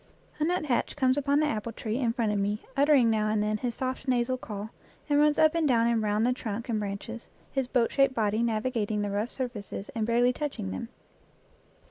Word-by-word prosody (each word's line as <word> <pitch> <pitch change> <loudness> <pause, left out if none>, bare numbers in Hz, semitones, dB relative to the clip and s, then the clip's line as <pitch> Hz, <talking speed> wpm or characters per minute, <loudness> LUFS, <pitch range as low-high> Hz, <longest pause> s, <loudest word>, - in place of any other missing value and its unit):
A - - +1
nuthatch 310 -7 0
comes 260 -3 +3
upon 285 0 +2
the - - +3
apple 230 -5 -2
tree 225 0 -3
in 240 -4 +1
front 230 -2 0
of 205 - 0
me, 205 +2 -1
uttering 275 -5 +5
now 215 -1 +1
and 215 -1 +1
then 215 0 0
his 240 +1 -3
soft 260 +1 -4
nasal 250 0 +1
call, 215 -3 -7 0.4
and 290 -1 +3
runs 300 0 +4
up 315 0 +5
and 330 -2 +1
down 230 -4 +3
and 235 -1 +2
round 210 +1 +1
the 250 - +3
trunk 235 -1 -5
and 220 -2 0
branches, 210 +3 -6 0.2
his 270 -2 -1
boat 245 -3 +1
shaped 275 -1 +3
body 215 0 +1
navigating 220 -2 0
the 205 - -2
rough 210 +4 -1
surfaces 230 -7 -5
and 225 -2 -2
barely 240 +2 +3
touching 275 - -4
them. 95 - -5
235 Hz, 210 wpm, -28 LUFS, 215-260 Hz, 0.4 s, uttering